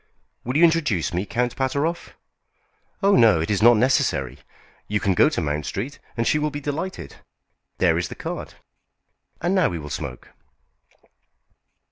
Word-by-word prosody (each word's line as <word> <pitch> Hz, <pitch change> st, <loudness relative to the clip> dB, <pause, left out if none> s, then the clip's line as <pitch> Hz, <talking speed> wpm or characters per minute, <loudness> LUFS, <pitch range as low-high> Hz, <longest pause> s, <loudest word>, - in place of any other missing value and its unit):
"Will 125 Hz, +4 st, -1 dB
you 165 Hz, -, +4 dB
introduce 150 Hz, -, +2 dB
me, 90 Hz, +4 st, -2 dB
Count 120 Hz, 0 st, -1 dB
Pateroff?" 140 Hz, +6 st, -2 dB, 0.9 s
"Oh, 200 Hz, 0 st, +5 dB
no; 110 Hz, -, +5 dB
it 80 Hz, +5 st, -2 dB
is 100 Hz, -, 0 dB
not 120 Hz, 0 st, +7 dB
necessary. 75 Hz, -, +1 dB, 0.5 s
You 105 Hz, 0 st, 0 dB
can 100 Hz, -2 st, +1 dB
go 145 Hz, -, +5 dB
to 150 Hz, -, -2 dB
Mount 75 Hz, -1 st, -2 dB
Street, 125 Hz, +9 st, -5 dB, 0.2 s
and 115 Hz, -, 0 dB
she 150 Hz, -, +2 dB
will 150 Hz, 0 st, 0 dB
be 145 Hz, 0 st, -6 dB
delighted. 145 Hz, -, -5 dB, 0.6 s
There 85 Hz, -2 st, +2 dB
is 90 Hz, -, -2 dB
the -, -, -9 dB
card. -, -, -6 dB, 0.9 s
And 175 Hz, +3 st, 0 dB
now 185 Hz, -3 st, +3 dB
we 85 Hz, -, -4 dB
will 75 Hz, -2 st, -8 dB
smoke." -, -, -6 dB
120 Hz, 160 wpm, -23 LUFS, -, 0.9 s, not